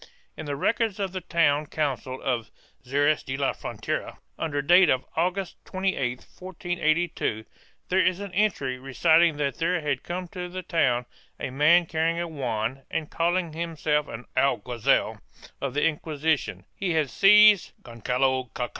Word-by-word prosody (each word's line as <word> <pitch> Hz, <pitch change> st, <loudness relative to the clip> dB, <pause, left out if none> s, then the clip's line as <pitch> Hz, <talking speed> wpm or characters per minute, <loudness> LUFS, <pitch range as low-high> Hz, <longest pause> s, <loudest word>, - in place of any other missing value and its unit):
In 155 Hz, -, -7 dB
the 145 Hz, -, -2 dB
records 220 Hz, -, 0 dB
of 195 Hz, -2 st, -2 dB
the 185 Hz, 0 st, -5 dB
town 155 Hz, -4 st, +1 dB
council 135 Hz, -4 st, -3 dB
of 120 Hz, -4 st, -1 dB, 0.3 s
Xeres 145 Hz, +4 st, +1 dB
de 135 Hz, -1 st, -4 dB
la 140 Hz, -1 st, 0 dB
Frontera, -, -, -5 dB, 0.2 s
under 145 Hz, -3 st, -2 dB
date 175 Hz, +3 st, +6 dB
of 130 Hz, 0 st, +1 dB
August 180 Hz, +3 st, -1 dB
28, 160 Hz, -10 st, -2 dB, 0.2 s
1482, 175 Hz, -9 st, -1 dB, 0.4 s
there 185 Hz, +1 st, +3 dB
is 185 Hz, 0 st, +1 dB
an 200 Hz, -2 st, -7 dB
entry 165 Hz, -11 st, 0 dB
reciting 150 Hz, +5 st, +3 dB
that 140 Hz, -2 st, -2 dB
there 175 Hz, +2 st, +1 dB
had 145 Hz, -4 st, -1 dB
come 180 Hz, +1 st, -5 dB
to 180 Hz, -1 st, -6 dB
the 185 Hz, +1 st, -6 dB
town 125 Hz, -9 st, +1 dB, 0.3 s
a -, -, -4 dB
man 155 Hz, +6 st, +4 dB
carrying 165 Hz, +1 st, 0 dB
a 170 Hz, -, -2 dB
wand 130 Hz, -4 st, -3 dB
and 155 Hz, -2 st, -3 dB
calling 170 Hz, 0 st, 0 dB
himself 155 Hz, -2 st, -1 dB
an 115 Hz, +2 st, -8 dB
alguazil 120 Hz, -3 st, +1 dB, 0.4 s
of 140 Hz, -1 st, -3 dB
the 150 Hz, -, +2 dB
Inquisition; 155 Hz, -1 st, -1 dB
he 185 Hz, -3 st, -1 dB
had 155 Hz, -4 st, 0 dB
seized 210 Hz, -1 st, +6 dB
Gongalo 125 Hz, +2 st, -1 dB
Cac. 125 Hz, -1 st, -2 dB
155 Hz, 155 wpm, -26 LUFS, 135-175 Hz, 0.4 s, date